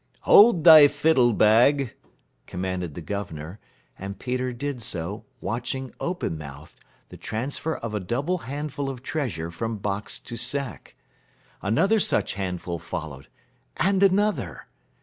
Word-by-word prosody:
"Hold 205 -6 +6
thy 155 -3 +10
fiddle 145 -4 +3
bag," 120 +5 +4 0.5
commanded 90 -3 -4
the 85 - -7
governor, 85 -1 -6 0.4
and 95 +1 -6
Peter 125 +1 -2
did 125 +1 -5
so, 95 +1 -4 0.2
watching, 125 +3 -4
open 170 - -3
mouthed, 70 -2 -11 0.3
the - - -11
transfer 140 +7 -3
of 115 -2 -6
a 105 - -1
double 140 - -2
handful 140 +1 -4
of 130 -2 -7
treasure 95 - -3
from 110 +6 -4
box 100 0 -3
to 120 - -9
sack. 125 - -2 0.7
Another 190 - +2
such - - 0
handful 90 -3 -4
followed, 70 -4 -7 0.5
and 195 0 +2
another. 200 +2 +1
120 Hz, 130 wpm, -25 LUFS, 95-145 Hz, 0.7 s, thy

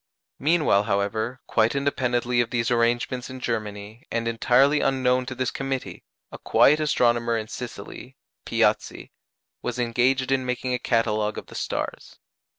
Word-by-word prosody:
Meanwhile, 150 -9 +3
however, 110 +4 -1
quite 115 +3 +2
independently 125 -3 +1
of 115 - -2
these 120 +1 -1
arrangements 120 +2 0
in 130 0 -8
Germany, 110 -1 -4
and 115 0 -2
entirely 130 +5 +3
unknown 130 -1 +1
to 130 - -5
this 130 +1 -1
committee, 135 -1 -4 0.3
a - - -9
quiet 150 +2 +4
astronomer 120 -6 +2
in 110 -1 -4
Sicily, 125 +2 -8 0.3
Piazzi, - - 0 0.5
was - - -4
engaged 125 +2 +1
in 135 -1 +2
making 125 0 -2
a 125 - 0
catalogue 110 -3 0
of - - -6
the - - -14
stars. - - -4
125 Hz, 145 wpm, -24 LUFS, 115-130 Hz, 0.5 s, quiet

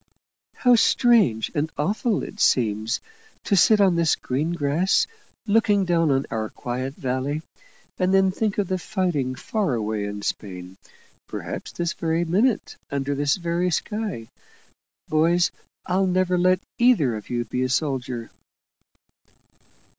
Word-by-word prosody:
"How 245 -1 +4
strange 220 - +3
and 155 +2 -1
awful 205 +7 0
it 210 - -8
seems, 110 - +1 0.4
to 200 - +1
sit 210 +4 +5
on 190 -3 +4
this 170 -2 +3
green 150 +7 -2
grass, 165 +4 +2 0.4
looking 205 -2 +3
down 165 -3 +2
on 135 0 +1
our 110 -1 -2
quiet 130 +3 -5
valley, 135 +4 -2 0.6
and 185 0 +2
then 190 0 +4
think 210 +1 -2
of 205 -3 0
the 185 0 -1
fighting 170 -10 -1
far 195 - -1
away 110 -2 -2
in 100 0 -6
Spain 90 -3 -5 0.5
perhaps - - -6
this 170 -1 -2
very 165 +1 -1
minute, 210 +8 +1
under 140 0 -2
this 145 0 +1
very 175 0 -1
sky. 205 - -3 0.8
Boys, 170 +3 +2 0.3
I'll 190 +1 +1
never 185 0 +1
let 185 +1 +3 0.2
either 215 - +4
of 105 - -8
you 120 -1 -1
be 125 +3 -3
a 130 - 0
soldier." 130 -4 -2
165 Hz, 140 wpm, -24 LUFS, 130-190 Hz, 0.8 s, sit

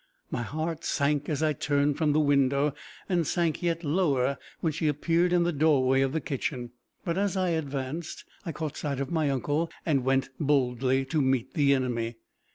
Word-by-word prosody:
My 120 - -2
heart 155 +6 -3
sank 145 0 0
as 155 0 -1
I 155 -1 +2
turned 145 0 +1
from 155 0 +1
the 150 - +3
window, 140 -1 +3 0.3
and 175 -5 +1
sank 170 -3 0
yet 170 -1 -1
lower 140 -5 +1 0.2
when 160 -2 0
she 155 +1 -1
appeared 165 +4 +2
in 175 -1 +4
the 175 0 0
doorway 135 -3 +3
of 135 -1 +1
the 160 - 0
kitchen. 135 -4 -3 0.3
But 170 +1 0
as 200 -1 0
I 185 -1 +1
advanced, 145 0 -3 0.2
I 165 - -4
caught 155 -1 -5
sight 140 -3 -3
of 140 -1 -3
my 160 -4 +1
uncle, 145 +5 0 0.2
and 140 -6 +2
went 135 +1 +1
boldly 135 -3 +1
to 150 +3 0
meet 130 -2 0
the 140 -3 +4
enemy. 120 -3 -2
145 Hz, 185 wpm, -28 LUFS, 135-160 Hz, 0.3 s, in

